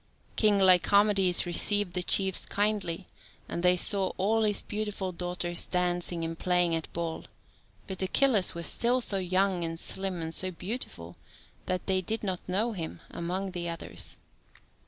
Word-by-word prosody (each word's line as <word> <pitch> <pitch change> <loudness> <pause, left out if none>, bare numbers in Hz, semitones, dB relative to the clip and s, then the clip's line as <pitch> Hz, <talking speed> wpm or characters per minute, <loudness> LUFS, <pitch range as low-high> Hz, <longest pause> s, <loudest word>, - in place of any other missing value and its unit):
King 210 -2 +3
Lycomedes 190 0 +4
received 195 +2 +2
the 180 - -1
chiefs 190 +2 +3
kindly, 200 -4 -1 0.4
and 170 - -4
they 180 0 +4
saw 195 +1 +3
all 215 +4 +1
his 210 -2 0
beautiful 210 -3 -4
daughters 175 0 -2
dancing 175 -1 -1
and 165 0 -5
playing 180 -2 +2
at 165 -1 -3
ball, 165 -1 -4 0.6
but 190 -1 -4
Achilles 210 0 +3
was 170 0 -3
still 245 +2 +2
so 215 -5 +2
young 185 0 0
and 165 0 -3
slim 190 -1 -1
and 160 0 -4
so 185 - +1
beautiful 175 - -6 0.5
that 185 -1 -2
they 190 -1 +1
did 220 +5 -4
not 185 -3 -2
know 210 +6 0
him 170 -7 -6
among 185 +3 -4
the 175 -1 -4
others. 165 -1 -3
185 Hz, 155 wpm, -28 LUFS, 175-200 Hz, 0.6 s, Lycomedes